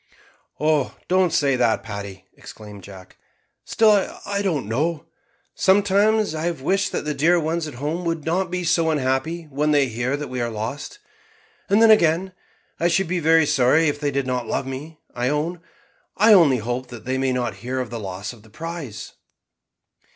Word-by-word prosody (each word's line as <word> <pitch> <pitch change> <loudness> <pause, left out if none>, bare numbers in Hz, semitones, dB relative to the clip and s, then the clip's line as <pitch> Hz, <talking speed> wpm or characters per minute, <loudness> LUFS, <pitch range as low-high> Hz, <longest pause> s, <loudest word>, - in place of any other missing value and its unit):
"Oh! 150 -2 +1
don't 185 -1 +2
say 140 -3 +2
that, 120 -3 +1
Paddy," 100 -3 -8
exclaimed 105 -2 -12
Jack; 95 -1 -13 0.5
"still 210 -3 +2
I 200 0 -2
don't 170 - -1
know. 150 +8 -1 0.5
Sometimes 205 0 +3
I 155 +1 -3
have 170 -4 -2
wished 195 +5 +1
that - - -3
the 150 - -1
dear 165 +5 +3
ones 160 0 -2
at 145 - -9
home 150 +7 -3
would 165 -3 -2
not 180 +3 0
be 180 0 -3
so 165 -1 +2
unhappy 150 +3 -1
when 150 +3 0
they 145 -3 +3
hear 120 +4 -2
that 150 0 -5
we 125 -1 -4
are 120 - -1
lost; 115 - -5 0.7
and 205 +3 +4
then 225 - +7
again 180 -2 +3 0.5
I 170 - +2
should 190 +1 +1
be 180 +1 -1
very 160 0 +4
sorry 145 +4 +3
if 145 - -4
they 145 -1 0
did 140 -1 -1
not 125 -2 -2
love - - -2
me, 140 +4 -7 0.2
I 125 +1 -1
own. 160 +4 -2 0.6
I 215 +2 +6
only 160 -9 +6
hope 120 +3 -4
that 120 -2 -11
they 130 +1 -1
may 135 -1 +1
not 125 -2 -2
hear 130 +2 -3
of 125 -3 -4
the 120 - -4
loss 100 +2 -6
of 115 - -16
the 110 - -19
prize." 160 -5 -7
150 Hz, 190 wpm, -22 LUFS, 125-170 Hz, 0.7 s, then